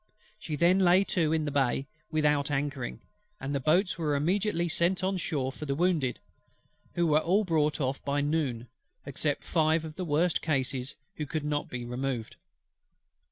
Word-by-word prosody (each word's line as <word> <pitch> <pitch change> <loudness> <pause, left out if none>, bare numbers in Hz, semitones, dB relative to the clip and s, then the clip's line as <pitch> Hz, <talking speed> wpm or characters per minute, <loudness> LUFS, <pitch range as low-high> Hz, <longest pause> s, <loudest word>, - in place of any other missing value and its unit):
She 155 -7 -4
then 175 +5 +4
lay 185 +1 +5
to 160 -3 +2
in 160 -1 +1
the 145 - -2
bay 135 -1 +1 0.2
without 150 -2 +2
anchoring, 140 -3 -2 0.4
and 140 -4 -4
the 140 - +1
boats 175 +7 +2
were 150 -3 +1
immediately 175 +3 +1
sent 175 +3 +1
on 190 0 +1
shore 145 -7 -2
for 150 +2 -8
the 140 - 0
wounded; 160 -6 +1 0.8
who 175 - +2
were 155 -1 +4
all 190 +7 +2
brought 155 -5 +1
off 135 -1 -2
by 140 0 0
noon, 140 -6 -1 0.4
except 145 +1 -1
five 160 0 +2
of 155 -1 -9
the 185 - -2
worst 160 +2 +1
cases 135 -3 -1 0.2
who 150 - -3
could 150 +1 -3
not 145 0 -1
be 120 -1 -5
removed. 125 -1 -3
150 Hz, 170 wpm, -29 LUFS, 140-170 Hz, 0.8 s, lay